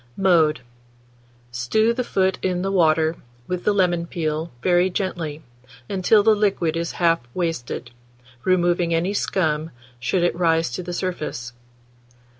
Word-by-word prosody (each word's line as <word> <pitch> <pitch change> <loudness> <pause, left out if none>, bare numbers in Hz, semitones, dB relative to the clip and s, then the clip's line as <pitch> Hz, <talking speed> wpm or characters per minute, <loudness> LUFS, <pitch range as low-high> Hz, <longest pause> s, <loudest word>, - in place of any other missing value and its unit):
Mode. 165 -7 +3 0.9
Stew 215 - +1
the 250 +1 -2
foot 190 -4 0
in 180 -1 -1
the 195 - -1
water, 160 -3 +3 0.3
with 180 +3 -4
the - - +4
lemon 175 -4 +1
peel, 160 -1 -2
very 180 0 +3
gently, 170 -5 -3 0.4
until 200 +2 +3
the 220 +1 +5
liquid 195 -6 +1
is 170 0 -2
half 165 -1 +2 0.2
wasted, 165 -8 -3 0.5
removing 175 -2 +2
any 175 +5 0
scum, 160 -6 0 0.3
should 130 +9 0
it 175 - +1
rise 165 -4 +1
to 155 - -4
the 175 0 -6
surface. 155 -9 -4
175 Hz, 135 wpm, -22 LUFS, 160-185 Hz, 0.9 s, the